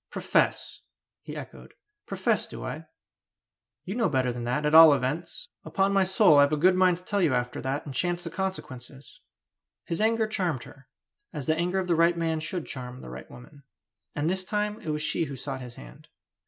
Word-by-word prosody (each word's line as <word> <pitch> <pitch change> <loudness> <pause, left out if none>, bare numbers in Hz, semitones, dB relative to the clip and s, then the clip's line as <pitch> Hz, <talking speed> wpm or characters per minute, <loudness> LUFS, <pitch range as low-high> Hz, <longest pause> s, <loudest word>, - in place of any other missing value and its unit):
"Profess!" - - 0 0.4
he - - -8
echoed. - - -11 0.3
"Profess, - - 0
do - - -8
I? - - -6 1.0
You 190 - -4
know 230 -4 +1
better 130 -4 0
than 120 0 -5
that, 125 +5 -1
at 150 - +1
all 160 -2 +10
events! 145 +6 -4
Upon 195 +1 0
my 195 -1 +4
soul 185 -5 +5
I've 140 +1 +5
a 150 - +1
good 180 +5 +5
mind 185 -1 +3
to 180 - -15
tell 200 +2 -1
you 155 -7 +3
after 125 0 -2
that, 135 +2 -3
and 140 - -7
chance 175 +3 -1
the 165 - -6
consequences!" 145 -8 -6 0.6
His 170 - -2
anger 225 0 +2
charmed 215 - -1
her, - - -15 0.4
as 145 - -5
the 155 - +2
anger 175 +3 -1
of 190 - 0
the 175 - +1
right 170 +1 +3
man 165 -1 -1
should 175 +2 -4
charm 125 -1 -7
the - - -10
right - - -9
woman. 140 +4 -14 0.5
And 145 +2 -1
this 185 +2 0
time 210 +2 -2
it - - -6
was 150 0 -1
she 165 - 0
who 140 - -7
sought 130 +1 -6
his 125 -2 -9
hand. - - -13
160 Hz, 205 wpm, -27 LUFS, 135-185 Hz, 1.0 s, all